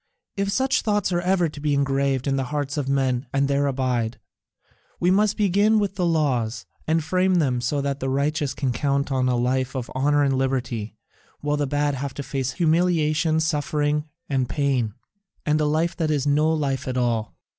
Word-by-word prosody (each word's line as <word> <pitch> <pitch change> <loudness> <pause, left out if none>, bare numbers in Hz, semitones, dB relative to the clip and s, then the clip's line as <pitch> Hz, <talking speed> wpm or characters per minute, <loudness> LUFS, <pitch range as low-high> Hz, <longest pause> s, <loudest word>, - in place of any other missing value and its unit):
If 200 0 -1
such 265 +4 +1
thoughts 205 -3 0
are 175 0 +1
ever 180 -1 +2
to 150 -1 -9
be 145 -1 0
engraved 135 -1 +1
in 135 -1 +1
the 135 -1 -1
hearts 145 0 -3
of 145 -3 -2
men 135 -1 0
and 140 0 +1
there 140 0 +1
abide, 125 -4 -1 0.8
we 180 - +3
must 205 +2 +2
begin 205 +2 +3
with 205 -3 0
the 180 -3 0
laws, 125 - 0 0.2
and 160 0 +2
frame 185 +3 +2
them 130 -8 +1
so 140 +4 0
that 140 0 -2
the 135 - -2
righteous 145 +1 0
can 135 -3 -1
count 140 +2 0
on 130 -1 +1
a 125 - +2
life 130 +2 0
of 125 -3 -4
honour 145 +2 +2
and 135 -1 +2
liberty, 125 -5 -2 0.5
while 145 0 0
the 145 -1 0
bad 145 +1 0
have 135 0 -4
to 140 - -4
face 135 -1 -3
humiliation, 160 -2 +2
suffering, 150 -1 0 0.2
and 130 -3 0
pain, 130 -7 0 0.5
and 155 0 +2
a - - +2
life 160 +3 +1
that 160 -2 0
is 145 -3 0
no 150 +2 +3
life 140 -4 -1
at 130 -1 -2
all. 115 -3 -1
145 Hz, 195 wpm, -24 LUFS, 130-160 Hz, 0.8 s, we